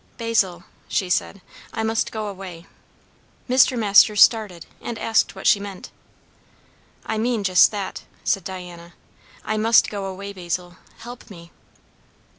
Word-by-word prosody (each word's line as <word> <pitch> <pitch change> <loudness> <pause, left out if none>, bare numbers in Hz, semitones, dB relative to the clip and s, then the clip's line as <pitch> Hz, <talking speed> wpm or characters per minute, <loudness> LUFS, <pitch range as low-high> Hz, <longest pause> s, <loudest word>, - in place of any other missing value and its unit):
"Basil," 205 -7 0 0.2
she 185 -2 -1
said, 200 +2 -1 0.3
"I 225 - -2
must 225 0 -1
go 215 -1 -4
away." 185 -4 -8 0.8
Mr. 255 0 +4
Masters 210 -1 +5
started, 210 -7 +1 0.2
and 235 - -5
asked 225 +1 +1
what - - -10
she 205 - +5
meant. 200 -2 -9 1.1
"I 220 - -2
mean 230 -2 0
just 185 -2 +5
that," 205 -3 -5 0.2
said 195 - 0
Diana. 175 -2 -9 0.5
"I 215 - -1
must 225 +1 +4
go 200 -2 -4
away 195 +1 -7
Basil, 175 -1 -5 0.2
help 240 +2 -11
me!" 170 -3 -13
200 Hz, 135 wpm, -22 LUFS, 180-220 Hz, 1.1 s, Masters